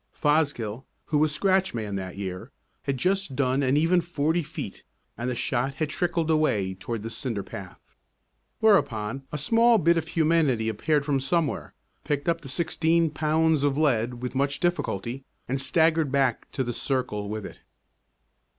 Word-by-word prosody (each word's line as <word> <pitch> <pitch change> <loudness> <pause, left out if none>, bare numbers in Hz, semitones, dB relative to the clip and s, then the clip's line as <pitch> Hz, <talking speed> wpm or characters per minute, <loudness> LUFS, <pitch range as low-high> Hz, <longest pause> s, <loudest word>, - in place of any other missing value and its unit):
Fosgill, 140 -7 0 0.2
who 150 - +1
was 155 0 +3
scratch 190 +1 +1
man 105 -3 -3
that 95 -1 -5
year, 95 +4 -5 0.4
had 140 -1 -1
just 185 0 0
done 130 0 +1
an 135 +1 +2
even 170 +3 +3
forty 165 0 0
feet 150 - -7 0.3
and 120 +3 -3
the 125 - -2
shot 130 +3 -1
had 150 +2 -2
trickled 165 -1 0
away 110 -12 +1
toward 105 +4 -5
the 115 - -5
cinder 115 -3 -4
path. 95 -1 -9 0.8
Whereupon 135 - +2
a 150 - -3
small 230 - +4
bit 170 -2 +3
of 165 -1 -2
humanity 155 -9 +2
appeared 145 +7 0
from 140 -2 +1
somewhere, 155 +2 -1 0.3
picked 145 0 -2
up 165 0 +1
the 135 - -9
sixteen 165 +2 +1
pounds 155 0 +2
of 145 -1 +1
lead 125 -5 +1
with 125 - -3
much 140 +1 0
difficulty, 130 - -2 0.2
and 135 +2 -1
staggered 160 0 +2
back 135 -4 0
to 135 - 0
the 120 -1 -3
circle 115 -6 -2
with 105 -1 -4
it. - - -10
140 Hz, 165 wpm, -26 LUFS, 120-160 Hz, 0.8 s, small